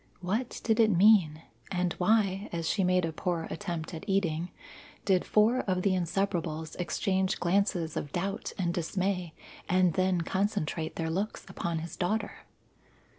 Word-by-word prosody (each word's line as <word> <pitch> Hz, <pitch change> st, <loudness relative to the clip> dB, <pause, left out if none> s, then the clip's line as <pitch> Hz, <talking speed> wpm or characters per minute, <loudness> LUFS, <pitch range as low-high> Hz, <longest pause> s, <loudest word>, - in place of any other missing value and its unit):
What 215 Hz, +8 st, -2 dB
did 225 Hz, 0 st, +2 dB
it 220 Hz, -1 st, +6 dB
mean? 180 Hz, -5 st, +5 dB, 0.3 s
and 180 Hz, -2 st, 0 dB
why, 200 Hz, 0 st, +2 dB
as 165 Hz, -1 st, -2 dB
she 195 Hz, -, +1 dB
made 180 Hz, -1 st, +3 dB
a 165 Hz, -, -2 dB
poor 170 Hz, 0 st, -2 dB
attempt 175 Hz, -5 st, -4 dB
at 160 Hz, -, -6 dB
eating, 175 Hz, -3 st, 0 dB, 0.6 s
did 190 Hz, -3 st, +3 dB
four 220 Hz, +4 st, +3 dB
of 185 Hz, -5 st, -1 dB
the 200 Hz, -, +3 dB
Inseparables 175 Hz, -3 st, -1 dB
exchange 190 Hz, +1 st, 0 dB
glances 175 Hz, -2 st, +1 dB
of 145 Hz, -, -4 dB
doubt 195 Hz, +5 st, -3 dB
and 175 Hz, -3 st, 0 dB
dismay 180 Hz, 0 st, -2 dB, 0.3 s
and 180 Hz, -2 st, +3 dB
then 185 Hz, -1 st, +1 dB
concentrate 180 Hz, -3 st, -1 dB
their 160 Hz, -1 st, -2 dB
looks 195 Hz, +6 st, -3 dB
upon 170 Hz, -1 st, -3 dB
his 165 Hz, +1 st, -6 dB
daughter? 210 Hz, +4 st, -2 dB
180 Hz, 150 wpm, -29 LUFS, 170-200 Hz, 0.6 s, it